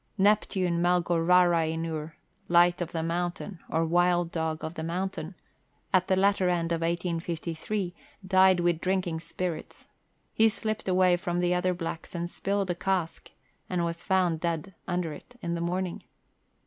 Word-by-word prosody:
Neptune 190 -4 +2
Melgorarainur 165 -2 +2 0.3
(Light 175 +1 +4
of 175 - -3
the 165 -1 -2
Mountain 175 +2 -3
or 165 +1 +1
Wild 175 0 +2
dog 160 -1 -2
of 160 - -4
the 160 - -6
Mountain), 175 +1 -3 0.6
at 185 -1 +4
the 190 - +3
latter 195 -1 +3
end 170 -1 0
of 165 -1 0
1853, 170 +2 -2 0.3
died 190 -1 +5
with 170 -1 +1
drinking 185 -3 0
spirits; 165 0 -5 0.5
he 225 0 +5
slipped 215 -1 -4
away 185 -1 +4
from 175 0 -2
the 175 0 +2
other 180 0 +1
blacks 165 0 -6
and 170 0 -3
spilled 200 -1 -1
a - - +1
cask, 185 -2 -2 0.4
and 175 -2 0
was 170 0 -4
found 185 -4 +1
dead 170 +3 -2
under 175 -3 -1
it 245 +11 -13
in 170 -6 -3
the 170 - -2
morning. 180 +1 -2
175 Hz, 150 wpm, -28 LUFS, 165-185 Hz, 0.6 s, died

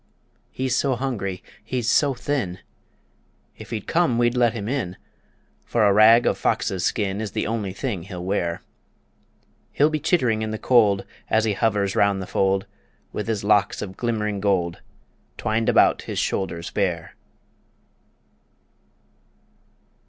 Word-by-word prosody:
He's 130 -1 -2
so 135 -2 +1
hungry, 110 -8 -3 0.2
he's 120 +1 -3
so 140 +3 +3
thin, 120 -9 -2 1.0
If - - -12
he'd 110 -4 -4
come 165 -8 +1
we'd 120 0 +2
let 120 -2 +3
him 105 -3 -5
in, 115 -9 -3 0.7
For 115 +6 +1
a 100 - +5
rag 110 +3 +6
of - - +1
fox's 95 -2 0
skin 100 0 -1
Is 105 -3 -5
the - - -1
only 105 -3 -2
thing 100 -1 -4
he'll 90 0 -7
wear. 85 -3 -1 1.1
He'll 150 +2 +3
be 155 - -1
chittering 125 -9 +1
in 110 - -2
the 110 - -3
cold 105 -5 +3 0.2
As 110 - +3
he 110 - +1
hovers 100 -2 0
round 100 -1 +2
the 95 - -4
fold, 95 +1 +1 0.5
With 105 - -4
his 110 -3 -2
locks 100 -2 +2
of 95 -2 -8
glimmering 105 -3 -2
gold 95 -4 0 0.6
Twined 110 +1 0
about - - +4
his - - -6
shoulders 85 -3 -2
bare. 90 -5 -2
105 Hz, 145 wpm, -23 LUFS, 95-120 Hz, 1.1 s, rag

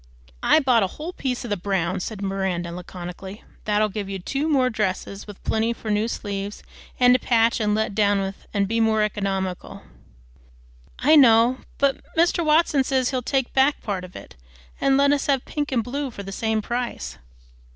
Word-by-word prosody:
"I - - +5
bought 255 -6 +3
a 195 - +2
whole 330 +4 -5
piece 255 -6 -3
of 240 - -6
the 205 - +1
brown," 185 -1 -1
said 200 +2 -5
Miranda 190 -3 -2
laconically. 180 +3 -8 0.2
"That'll 215 0 +2
give 205 -1 -5
you 195 - -3
two 275 - -2
more 260 -4 +3
dresses, 200 -1 -3
with 205 -2 -11
plenty 225 +1 0
for 220 -2 -5
new 210 +2 +1
sleeves, 200 -2 -5 0.4
and 250 0 +6
to 255 - +3
patch 230 0 +2
and 210 -1 +1
let 220 -1 -1
down 205 -1 +2
with, 195 0 -5
an' 200 -1 +1
be 225 +3 -1
more 220 -1 +3
economical." 195 -3 -3 1.1
"I 300 +5 +4
know. 240 -2 +6 0.2
But 280 -1 +1 0.2
Mr. 340 +1 +3
Watson 305 -3 +3
says 260 -1 0
he'll 255 -2 -1
take 265 0 -1
back 270 +2 +2
part 195 -4 -3
of 185 0 -11
it, - - -11 0.5
and 270 -1 +3
let 280 0 +4
us 290 -1 0
have 275 -3 +1
pink 295 -1 -3
and 240 -3 +1
blue 275 +3 -3
for 200 -4 -8
the 195 - -7
same 220 +1 -1
price." 240 - -4
220 Hz, 190 wpm, -23 LUFS, 195-260 Hz, 1.1 s, and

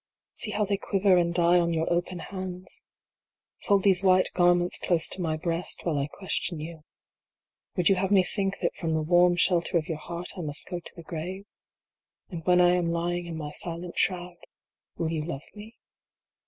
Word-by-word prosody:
See 220 - -1
how 210 0 0
they 200 0 0
quiver 195 -1 +2
and 170 -1 +2
die 175 +1 +4
on 170 -1 0
your 160 0 0
open 175 +1 -1
hands. 185 0 -5 0.8
Fold 200 -2 +3
these 190 -2 +4
white 185 -1 +4
garments 175 0 +3
close 170 -3 +3
to 185 - -4
my 160 -2 -1
breast, 170 +2 -1
while 155 -5 0
I 140 - -1
question 170 0 -2
you. 160 +1 -8 0.9
Would 175 -2 +2
you - - +6
have 190 +1 0
me 195 -2 +5
think 195 +1 -2
that - - 0
from 165 -2 -2
the 160 0 0
warm 175 +2 +4
shelter 175 -1 +2
of 155 - -2
your 160 -2 -4
heart 170 +3 -5
I - - -2
must 150 -3 -2
go 175 -1 -5
to 170 - -10
the 170 - -10
grave? 180 +5 -6 0.9
And 165 -2 -6
when 180 0 +5
I 175 0 +6
am 180 -1 +1
lying 175 +1 -2
in 165 -2 -5
my 150 -2 -5
silent 170 +2 -4
shroud, 180 -2 0 0.6
will 165 -1 -2
you 155 -2 -2
love 155 -3 -5
me 215 +2 -12
175 Hz, 195 wpm, -27 LUFS, 165-185 Hz, 0.9 s, you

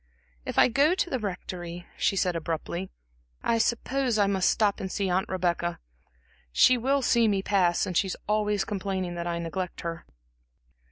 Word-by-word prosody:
"If - - -4
I - - +7
go 280 +8 +3
to 360 - -1
the 260 - 0
Rectory," 175 -3 -5
she - - +1
said 180 -2 +1
abruptly, 165 +3 -3 0.5
"I 230 - +2
suppose 245 +1 0
I 205 - +4
must 195 -2 +2
stop 205 -2 +2
to 195 -3 -4
see 195 -1 -1
Aunt 185 +2 0
Rebecca. 175 -2 -1 0.7
She 255 - +6
will 265 +3 +1
see 235 -1 +4
me 195 -2 +1
pass, 180 -4 +2
and 180 - -4
she 195 - +3
is 185 - -4
always 210 -1 +1
complaining 190 -3 -3
that 170 0 -4
I 170 0 -1
neglect 170 +2 -4
her." 165 0 -5
190 Hz, 175 wpm, -27 LUFS, 175-215 Hz, 0.7 s, I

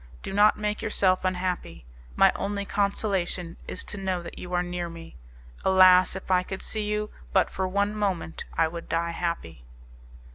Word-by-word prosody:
Do 195 - -5
not 210 +1 +5
make 210 0 -2
yourself 190 -3 +2
unhappy. 180 - -2 0.3
My - - +6
only 200 0 -2
consolation 195 -4 -1
is - - -4
to 210 - -7
know 185 -2 -2
that - - -9
you 180 - -8
are 180 0 +1
near 175 -1 -4
me. 165 0 -11 0.5
Alas! 185 -1 +6
if 190 0 -6
I 180 -1 +5
could 190 +1 -6
see 215 - -3
you 210 0 -2 0.2
but 190 - +3
for 190 0 -1
one 200 +2 0
moment 195 -6 -2
I 165 - +4
would 170 +1 -8
die 170 +1 0
happy." 165 - -4
185 Hz, 175 wpm, -26 LUFS, 175-200 Hz, 0.5 s, My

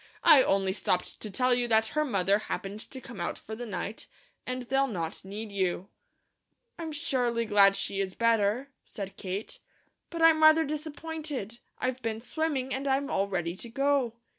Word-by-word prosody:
"I 310 -5 +8
only 195 -4 +2
stopped 180 -2 -1
to 215 - -4
tell 250 +5 +2
you 245 0 +1
that 220 -1 +3
her 305 +4 +1
mother 200 -6 +2
happened 205 -1 -5
to 265 - -7
come 235 -6 -9
out 170 - -2
for 220 - -8
the 240 +1 -6
night, 205 +1 -5 0.4
and 255 0 -3
they'll 270 +2 +1
not 170 -9 -4
need 205 +3 -7
you." 190 -1 -1 0.9
"I'm 325 -1 -4
surely 250 -7 0
glad 200 -2 +5
she 195 - -2
is 190 -1 -2
better," 230 +3 +2
said 200 -3 -7
Kate, 195 +3 -5 0.5
"but 335 -1 -2
I'm 320 -1 +6
rather 315 +1 +7
disappointed. 300 -6 -5 0.2
I've 255 0 -2
been 225 -2 -2
swimming, 270 0 -2
and 270 +2 -3
I'm 275 +1 +1
all 195 +1 +1
ready 175 -3 -2
to 235 - -7
go." 275 -1 +1
235 Hz, 175 wpm, -29 LUFS, 200-275 Hz, 0.9 s, I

